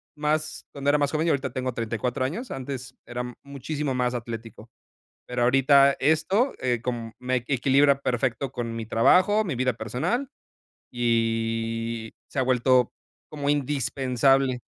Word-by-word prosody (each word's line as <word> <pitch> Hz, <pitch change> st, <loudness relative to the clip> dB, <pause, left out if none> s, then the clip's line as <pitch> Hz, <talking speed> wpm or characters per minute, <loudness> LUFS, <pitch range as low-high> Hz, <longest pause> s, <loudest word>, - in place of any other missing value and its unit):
más 150 Hz, +1 st, -1 dB
cuando 140 Hz, 0 st, -2 dB
era 150 Hz, -, +4 dB
más 145 Hz, -1 st, +1 dB
joven, 155 Hz, +2 st, 0 dB
yo -, -, +4 dB
ahorita 140 Hz, -1 st, -2 dB
tengo 130 Hz, -1 st, -3 dB
34 115 Hz, +2 st, -2 dB
años, 210 Hz, -, -4 dB
antes 130 Hz, -1 st, -6 dB
era 120 Hz, 0 st, -4 dB, 0.2 s
muchísimo 140 Hz, +1 st, -4 dB
más 125 Hz, -1 st, 0 dB
atlético, 115 Hz, -1 st, -7 dB, 0.6 s
pero, 125 Hz, 0 st, -2 dB
ahorita 135 Hz, +2 st, +5 dB
esto, 160 Hz, -, +2 dB
eh, 125 Hz, -2 st, 0 dB
com 115 Hz, -2 st, -4 dB
me 130 Hz, 0 st, 0 dB
equilibra 140 Hz, +1 st, +3 dB
perfecto 125 Hz, +1 st, -1 dB
con 115 Hz, -2 st, -4 dB
mi 115 Hz, -, -4 dB
trabajo, 185 Hz, -, +4 dB
mi 170 Hz, -9 st, -2 dB
vida 125 Hz, 0 st, 0 dB
personal, 125 Hz, -, -2 dB, 0.6 s
y 115 Hz, -1 st, -1 dB
se -, -, -7 dB
ha 130 Hz, -, +4 dB
vuelto 125 Hz, -1 st, +3 dB, 0.4 s
como 145 Hz, -2 st, -1 dB
indispensable 135 Hz, -2 st, +1 dB
130 Hz, 145 wpm, -25 LUFS, 120-140 Hz, 0.6 s, ahorita